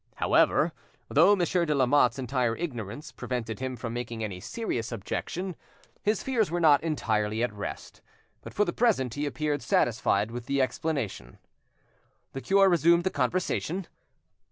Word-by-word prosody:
However, - - +3 0.4
though 205 - +6
Monsieur 180 -1 +1
de 150 -3 0
Lamotte's 130 -1 +3
entire 125 -3 0
ignorance 145 - -5
prevented 120 -3 -4
him 130 -1 -3
from 115 -1 -5
making 120 -2 -4
any 100 -4 -4
serious 120 - -4
objection, 170 - -4 0.5
his 210 0 0
fears 230 -8 +1
were 175 +2 -1
not 150 -4 +5
entirely 110 -8 -1
at 120 -3 -1
rest, 100 -1 -7 0.4
but - - -9
for 210 - +1
the - - -2
present 185 - +1
he 145 +2 -2
appeared 145 -1 -2
satisfied 110 -2 +1
with 120 0 -7
the 140 0 0
explanation. 130 - -2 1.0
The 135 - -5
cure 195 +4 +4
resumed 170 -1 +4
the 190 - 0
conversation. 175 +5 -1
135 Hz, 150 wpm, -28 LUFS, 115-170 Hz, 1.0 s, though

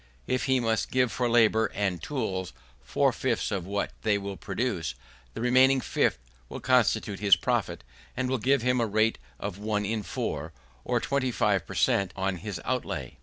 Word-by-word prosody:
If 130 - 0
he 130 -1 +3
must 115 -2 0
give 125 -2 +2
for 125 -1 0
labour 110 -1 +4
and 95 -4 -1
tools 95 - -3 0.3
four 60 - +1
fifths - - -1
of 95 -3 -3
what 100 +1 -2
they 105 -2 +2
will 100 -1 -5
produce, 95 - -3 0.4
the - - -4
remaining 130 +2 +5
fifth - - +1 0.3
will - - -6
constitute 100 -2 +2
his 100 -2 +6
profit, 85 - -1 0.3
and 130 0 0
will 130 0 0
give 135 +2 +2
him 125 -1 +2
a 115 - +1
rate 110 +2 +1 0.2
of 100 -1 -5
one 105 -1 -1
in 110 +1 -1
four, 80 -5 -4 0.3
or - - +1
twenty 140 -2 0
five 105 -5 +1
per - - -7
cent, 95 -2 +2
on 95 -1 -1
his 100 -1 -5
outlay. 130 -1 -3
110 Hz, 180 wpm, -27 LUFS, 95-125 Hz, 0.4 s, his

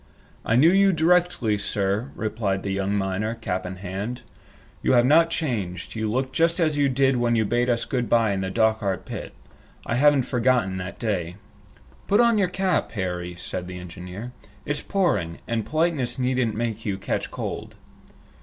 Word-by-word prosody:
"I 115 - +1
knew 155 +8 +6
you 195 0 +5
directly, 165 - +2
sir," 100 +4 -1
replied 105 -3 -2
the 100 - -2
young 100 +1 -1
miner, 100 +3 -1
cap 95 -5 -3
in 90 - -6
hand. 100 +6 -5 0.6
"You - - +2
have 120 -1 +5
not 165 +5 +5
changed. 105 - -3
You 110 -1 -2
look 130 +2 -1
just 165 +4 +2
as 155 -3 +2
you 145 -1 +2
did 135 0 +2
when 120 -1 +2
you 110 -1 +2
bade 120 +4 +1
us 120 -1 +1
good 125 -3 -2
by 115 -3 +3
in 95 -1 -1
the 95 - -2
Dochart 110 -2 +1
pit. - - -6 0.5
I - - -2
haven't 140 +2 +4
forgotten 125 -6 +1
that 90 +1 -6
day." 90 -7 -2 0.7
"Put 205 +2 +3
on 235 -2 +4
your 190 - +3
cap, 185 0 0
Harry," 90 -3 -3
said 90 +1 -5
the 90 0 -7
engineer. 90 +6 -8 0.3
"It's 145 - -2
pouring, 170 - 0
and 115 -2 -2
politeness 155 -6 0
needn't 125 -3 0
make 115 -1 -3
you 100 -3 -2
catch 100 - -3
cold." - - -5
115 Hz, 175 wpm, -24 LUFS, 95-135 Hz, 0.7 s, knew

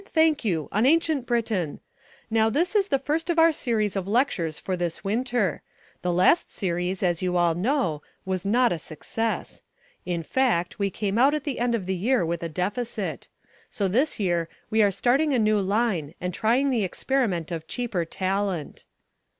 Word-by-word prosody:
Thank 320 -3 +2
you, 165 -8 -1
on 215 +5 +2
Ancient 315 -4 +2
Britain. 215 - -1 0.5
Now, 220 0 +3
this 345 - 0
is 400 -2 +3
the 275 - +2
first 310 +5 -2
of 340 - +1
our 330 0 +6
series 220 -9 -1
of 195 -1 -2
lectures 195 - 0
for 185 - -3
this 175 -1 -3
winter. 230 0 0 0.4
The 180 - 0
last 185 - +3
series, 180 0 -2
as 175 -2 +1
you 180 -1 0
all 175 -1 +3
know, 180 - 0 0.2
was 185 -2 -2
not 240 +5 +3
a 170 - -1
success. 225 +9 -4 0.4
In 175 -2 -2
fact, 220 -7 0
we 200 -1 +1
came 205 +3 -2
out 275 +4 +5
at 305 - -3
the 285 -4 -3
end 240 0 +1
of 205 -5 -3
the 190 - -1
year 225 +2 +1
with 170 0 -2
a 170 - -3
deficit. 205 +9 -3 0.4
So 205 -5 -1
this 255 +11 +1
year 175 -4 0 0.2
we 220 0 +4
are 205 - +5
starting 255 +10 +2
a - - +3
new 215 -2 +3
line 195 -6 0
and 180 0 -3
trying 250 +8 +2
the 230 -5 +1
experiment 190 - -1
of 160 -1 -5
cheaper 230 -8 -2
talent." 190 -2 -3
205 Hz, 185 wpm, -25 LUFS, 180-250 Hz, 0.5 s, our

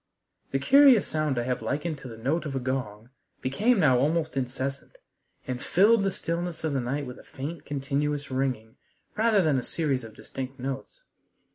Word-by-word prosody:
The 135 - 0
curious 265 - +6
sound 155 -4 -1
I 120 - +1
have 125 +1 -2
likened 150 +1 -2
to 135 - -9
the 115 -2 -9
note 150 +8 -1
of 135 - -4
a - - 0
gong 125 -3 -4 0.3
became 205 - +2
now 130 -7 +5
almost 155 +3 +1
incessant, 135 - -4 0.5
and 125 0 -4
filled 210 +4 +4
the 195 0 +1
stillness 170 -1 -4
of 155 -2 0
the 135 - +1
night 140 +4 -2
with 125 0 -8
a - - -14
faint, 150 +6 -7
continuous 145 0 -2
ringing 130 -4 -2 0.4
rather 215 -2 +3
than 150 -5 +2
a - - -2
series 140 -5 -1
of 110 -1 -11
distinct 135 0 -7
notes. 135 - -5
140 Hz, 180 wpm, -27 LUFS, 130-165 Hz, 0.5 s, curious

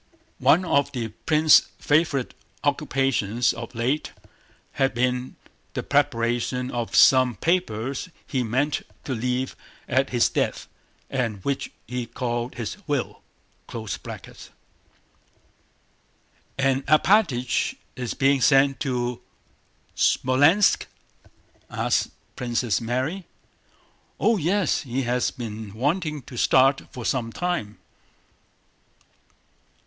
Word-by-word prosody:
(One 180 +4 +4
of 140 -4 +1
the 120 -3 -3
prince's 155 +8 +4
favorite 145 -4 +1 0.3
occupations 135 -5 +1
of - - -8
late 130 +7 -1 0.6
had 135 -2 0
been 125 +1 -1 0.4
the - - -2
preparation 120 +2 0
of 120 -1 -3
some 130 -2 +6
papers 140 - -1 0.2
he 130 - -1
meant 130 +6 0 0.2
to 135 - -3
leave 125 +2 -2 0.3
at 130 +2 +1
his 120 -2 +3
death - - -2 0.4
and 115 -7 -2
which 140 -1 -1 0.2
he 125 -1 -4
called 120 0 -3
his 115 - -5
"will.") 145 -4 -2 0.5
"And 110 -2 -4 2.9
Alpátych 155 - +3 0.2
is 125 -2 -4
being 140 -1 +3
sent 135 +1 +4
to 125 -3 -2 0.7
Smolénsk?" 145 +10 +3 0.8
asked - - 0 0.3
Princess 120 -2 -1
Mary. 130 +11 -2 0.9
"Oh, 225 -1 +3
yes, 185 +1 +1
he 130 0 -3
has 125 +1 +1
been 110 -4 -7
waiting 150 +3 -1
to 125 - -11
start 135 +3 +3
for 125 -2 -7
some 120 -3 -1
time." 175 -11 -3
130 Hz, 100 wpm, -24 LUFS, 120-145 Hz, 2.9 s, some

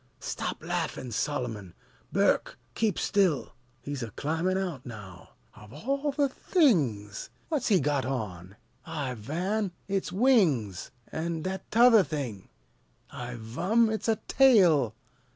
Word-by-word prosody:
Stop - - -4
laffin', 125 - -3
Solomon! 115 - -3 0.4
Burke, - - +2 0.2
keep 220 -5 0
still! 185 -12 +1 0.3
He's 140 0 -4
a 115 - -4
climbin' 165 - -1
out 180 -7 -3
now 105 -7 -11 0.2
Of 105 0 -14
all 275 - -2
the 285 0 +2
things! 145 - +1 0.2
What's 295 -6 0
he 200 -5 +4
got 145 -1 0
on? 100 -8 -4 0.3
I 145 -6 -4
van, 180 - -2 0.2
it's 195 -2 -1
wings! 180 - +2 0.2
An' 160 0 -3
that 190 +1 -4
t'other 230 -2 +6
thing? 135 - -5 0.6
I 120 0 -6
vum, 190 - +1
it's 220 - -3
a 225 - +3
tail! 175 - +5
155 Hz, 125 wpm, -28 LUFS, -, 0.6 s, t'other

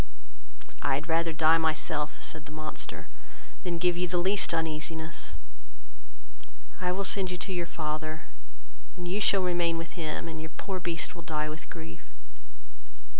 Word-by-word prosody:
"I 140 -2 +3
had 145 +4 -3
rather 165 0 +3
die 160 0 +6
myself, 155 -2 +1
(said 160 -1 -3
the - - -9
monster,) 155 0 -4 0.6
than 175 -1 0
give 175 +1 +4
you 180 0 +2
the 180 +1 +2
least 190 +3 +3
uneasiness: 160 0 -2 1.4
I 180 -1 +1
will 195 +2 0
send 195 -1 +3
you 180 - -1
to 190 +2 -2
your 175 -2 0
father, 155 0 -2 0.7
you 180 +3 -1
shall 195 -1 +6
remain 175 -2 +3
with 165 0 -4
him, 165 -2 -2
and 160 -1 -4 0.2
poor 190 -2 -2
Beast 170 0 -1
will 175 - -7
die 155 -2 -1
with 155 +1 -7
grief." 80 0 -7
165 Hz, 150 wpm, -30 LUFS, 155-180 Hz, 1.4 s, die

